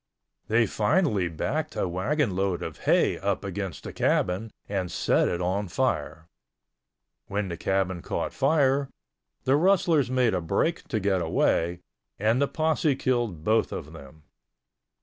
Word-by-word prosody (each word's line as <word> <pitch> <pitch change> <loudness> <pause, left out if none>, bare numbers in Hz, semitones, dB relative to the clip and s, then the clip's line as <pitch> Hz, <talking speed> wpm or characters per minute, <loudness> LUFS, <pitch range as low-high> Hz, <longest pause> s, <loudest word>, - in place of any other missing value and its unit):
They 115 +1 +3
finally 105 - +1
backed 150 - -3
a - - 0
wagonload 95 - 0
of - - -6
hay - - +3
up - - -1
against - - -5
the - - -7
cabin 95 +5 0 0.2
and 95 -3 -2
set - - +2
it 85 - -1
on 95 +3 -1
fire. 80 -1 -1 1.0
When 100 -1 -2
the 85 - -3
cabin 95 0 -1
caught - - -3
fire, 140 -1 +2 0.5
the 130 +1 +3
rustlers 165 -5 +3
made 125 -4 +2
a 90 - 0
break 155 - -1
to 110 - -1
get 95 -2 +1
away, 85 +1 +1 0.4
and 110 +6 +2
the 140 - +3
posse 155 -2 +1
killed 120 - -1
both 110 +3 +2
of 80 +3 -6
them. 80 0 -13
105 Hz, 145 wpm, -26 LUFS, 90-135 Hz, 1.0 s, They